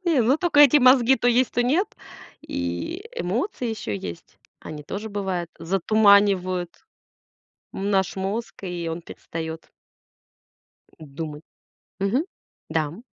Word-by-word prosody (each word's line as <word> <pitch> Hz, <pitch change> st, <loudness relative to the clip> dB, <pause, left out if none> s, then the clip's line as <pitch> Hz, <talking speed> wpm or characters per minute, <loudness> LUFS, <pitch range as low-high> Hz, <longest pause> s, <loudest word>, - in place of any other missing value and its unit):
Не, 320 Hz, -7 st, +3 dB
ну 260 Hz, +6 st, +3 dB
тока 335 Hz, -4 st, +3 dB
эти 290 Hz, +1 st, +8 dB
мозги 255 Hz, 0 st, +6 dB
то 245 Hz, -, +1 dB
есть, 245 Hz, +1 st, +3 dB
то 245 Hz, -, +2 dB
нет, 320 Hz, -, +2 dB, 0.6 s
и 85 Hz, -, -4 dB
эмоции 395 Hz, -, -2 dB
еще 110 Hz, -, -3 dB
есть, 85 Hz, -3 st, -9 dB, 0.2 s
они 150 Hz, -1 st, -8 dB
тоже, 205 Hz, +8 st, -6 dB
бывает, 190 Hz, -4 st, -3 dB
затуманивают 195 Hz, -1 st, +3 dB, 1.0 s
наш 195 Hz, -1 st, 0 dB
мозг, 200 Hz, +4 st, -4 dB
и 175 Hz, -3 st, -4 dB
он 165 Hz, +1 st, -4 dB
перестает 160 Hz, -1 st, -7 dB, 1.3 s
думать. 150 Hz, +1 st, -7 dB, 0.6 s
Мгм, 215 Hz, +10 st, +1 dB, 0.5 s
да, 160 Hz, -2 st, +1 dB
м. 185 Hz, +11 st, -11 dB
195 Hz, 120 wpm, -24 LUFS, 165-245 Hz, 1.3 s, эти